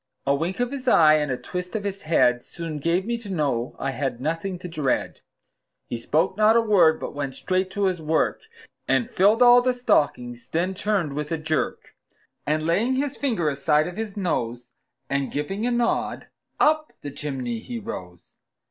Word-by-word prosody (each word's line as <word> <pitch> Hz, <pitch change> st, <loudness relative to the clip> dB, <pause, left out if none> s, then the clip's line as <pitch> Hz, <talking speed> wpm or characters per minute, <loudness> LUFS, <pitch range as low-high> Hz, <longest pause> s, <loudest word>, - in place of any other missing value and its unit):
A 140 Hz, -, +3 dB
wink 165 Hz, +8 st, -2 dB
of 245 Hz, +1 st, 0 dB
his 275 Hz, -2 st, -6 dB
eye, 155 Hz, -8 st, +6 dB
and 150 Hz, -2 st, -1 dB
a 125 Hz, -, -1 dB
twist 180 Hz, -, -6 dB
of 210 Hz, -, -2 dB
his 200 Hz, -1 st, -4 dB
head, 125 Hz, -6 st, +3 dB
Soon 165 Hz, +1 st, -6 dB
gave 170 Hz, +5 st, 0 dB
me 235 Hz, +1 st, -2 dB
to 220 Hz, -3 st, -10 dB
know 140 Hz, -9 st, -1 dB
I 135 Hz, -, -2 dB
had 135 Hz, -3 st, -3 dB
nothing 165 Hz, +6 st, -2 dB
to 180 Hz, -, -8 dB
dread. 150 Hz, -6 st, -2 dB, 0.6 s
He 120 Hz, -, -5 dB
spoke 155 Hz, +9 st, +1 dB
not 215 Hz, +2 st, +4 dB
a -, -, +6 dB
word, 195 Hz, -8 st, +4 dB
but -, -, -5 dB
went 140 Hz, -2 st, -4 dB
straight 185 Hz, 0 st, -1 dB
to 205 Hz, +1 st, -3 dB
his 185 Hz, -3 st, 0 dB
work, 160 Hz, +1 st, 0 dB, 0.5 s
And 130 Hz, -3 st, +2 dB
filled 210 Hz, +6 st, +4 dB
all 245 Hz, 0 st, +8 dB
the 250 Hz, 0 st, +1 dB
stockings; 125 Hz, -, 0 dB
then 175 Hz, +4 st, 0 dB
turned 190 Hz, -6 st, -1 dB
with 150 Hz, +2 st, -4 dB
a 165 Hz, -, 0 dB
jerk, 155 Hz, 0 st, -2 dB, 0.5 s
And 155 Hz, +1 st, 0 dB
laying 220 Hz, +10 st, +2 dB
his 275 Hz, 0 st, -1 dB
finger 225 Hz, -, -1 dB
aside 150 Hz, +2 st, +2 dB
of 180 Hz, -, -7 dB
his 220 Hz, -2 st, -5 dB
nose, 120 Hz, -, -2 dB, 0.4 s
And 140 Hz, -1 st, -1 dB
giving 195 Hz, +10 st, -2 dB
a -, -, 0 dB
nod, 240 Hz, -1 st, 0 dB, 0.3 s
up 310 Hz, 0 st, +2 dB
the 145 Hz, -, -5 dB
chimney 135 Hz, -5 st, -4 dB
he 240 Hz, -, -6 dB
rose. 90 Hz, -, -8 dB
165 Hz, 190 wpm, -24 LUFS, 140-210 Hz, 0.6 s, all